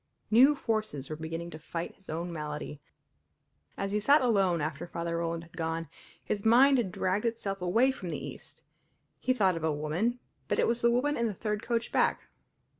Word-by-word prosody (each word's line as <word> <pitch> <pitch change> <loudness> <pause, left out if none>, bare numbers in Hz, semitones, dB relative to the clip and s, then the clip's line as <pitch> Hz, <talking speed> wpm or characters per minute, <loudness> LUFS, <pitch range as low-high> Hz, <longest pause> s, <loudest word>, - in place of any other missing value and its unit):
New 265 +7 +7
forces 215 - -2
were - - -2
beginning 165 +2 -5
to 155 - -8
fight 165 +2 -5
his 195 - -21
own 170 +2 -3
malady. 150 -2 -5 1.0
As 195 0 -2
he 210 - +1
sat 280 +9 +5
alone 195 -8 +3
after 155 +1 -3
Father 170 0 -3
Roland 165 0 -2
had 170 0 -17
gone, 165 -1 -3 0.4
his 205 -1 -2
mind 255 +4 +6
had 200 -6 -1
dragged 185 +3 0
itself 200 -4 -2
away 225 +9 +3
from 190 -9 -7
the - - -3
East; - - -9 0.6
he 255 - 0
thought 195 -8 +3
of 165 - -5
a 160 - +2
woman, 155 +11 -1 0.3
but - - 0
it - - +3
was 235 +1 0
the 235 - +5
woman 260 +5 +2
in 235 - +1
the 210 - -4
third 210 +1 -2
coach 230 0 -2
back. - - +2
190 Hz, 195 wpm, -30 LUFS, 165-230 Hz, 1.0 s, New